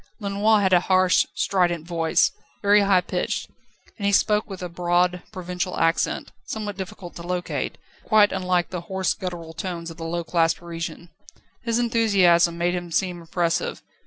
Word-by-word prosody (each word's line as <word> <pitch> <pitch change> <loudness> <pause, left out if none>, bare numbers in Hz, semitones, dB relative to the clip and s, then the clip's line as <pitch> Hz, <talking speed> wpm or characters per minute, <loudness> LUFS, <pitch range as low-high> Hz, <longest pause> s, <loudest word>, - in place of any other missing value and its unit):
Lenoir 205 +1 +2
had 190 -1 +2
a 180 - +7
harsh, 185 0 +3
strident 175 -4 +1
voice, 165 -2 +2 0.3
very 205 +1 +6
high 195 -2 +4
pitched, - - -2 0.5
and 200 - -3
he - - +3
spoke 210 +1 +2
with 190 -2 -7
a - - -2
broad, 175 +1 +1
provincial 180 0 -4
accent, 165 +1 0
somewhat 210 -2 -4
difficult 185 -2 -8
to - - -8
locate, 180 +1 -3 0.2
but - - -25
quite 215 -2 +6
unlike 180 -2 0
the 180 -2 -4
hoarse, 190 +2 -1
guttural 170 -3 -6
tones 170 0 -5
of 165 - -12
the 165 - -7
low 170 +1 -2
class 165 -1 +2
Parisian. 170 0 -7 0.5
His 230 -1 0
enthusiasm 195 -8 +3
made 175 +1 +1
him 175 -1 -4
seem 175 +1 -1
impressive. 165 0 -1
180 Hz, 165 wpm, -24 LUFS, 170-195 Hz, 0.5 s, a